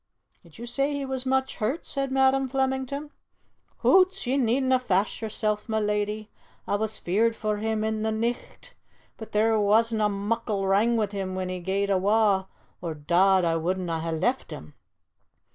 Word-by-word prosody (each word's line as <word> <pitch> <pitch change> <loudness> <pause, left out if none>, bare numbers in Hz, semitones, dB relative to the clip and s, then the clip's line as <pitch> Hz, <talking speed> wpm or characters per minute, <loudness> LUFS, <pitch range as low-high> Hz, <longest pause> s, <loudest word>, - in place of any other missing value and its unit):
"Did 170 -3 -18
you 235 - -7
say 275 +4 -1
he 280 -1 -3
was 265 -1 -4
much 265 0 0
hurt?" 250 +10 -2
said 275 -1 -2
Madam 265 0 +3
Flemington. 265 +2 -2 0.7
"Hoots! 380 -1 +4
ye 255 +2 0
needna' 260 0 +2
fash 205 -4 0
yersel', 215 -1 -1
ma 220 -1 -1
leddy! 210 0 -1 0.4
A' - - +1
was 220 +1 -2
feared 225 +6 +1
for 215 -1 -2
him 220 0 -1
i' 220 - 0
the 220 0 -1
nicht, 230 +2 -4 0.4
but 220 - -9
there 220 +1 +2
wasna' 215 +1 +3
muckle 205 0 -2
wrang 210 +5 +3
wi' 220 - +2
him 190 -2 -4
when 185 -1 -3
he 185 0 -4
gae'd 195 +3 -1
awa', 195 0 +2 0.3
or, 165 -3 -4
dod, 180 +5 +3
a' 165 -1 +1
wouldna' 175 -1 -2
hae 165 +1 -3
left 190 +12 -1
him!" - - -9
220 Hz, 165 wpm, -26 LUFS, 195-250 Hz, 0.7 s, Hoots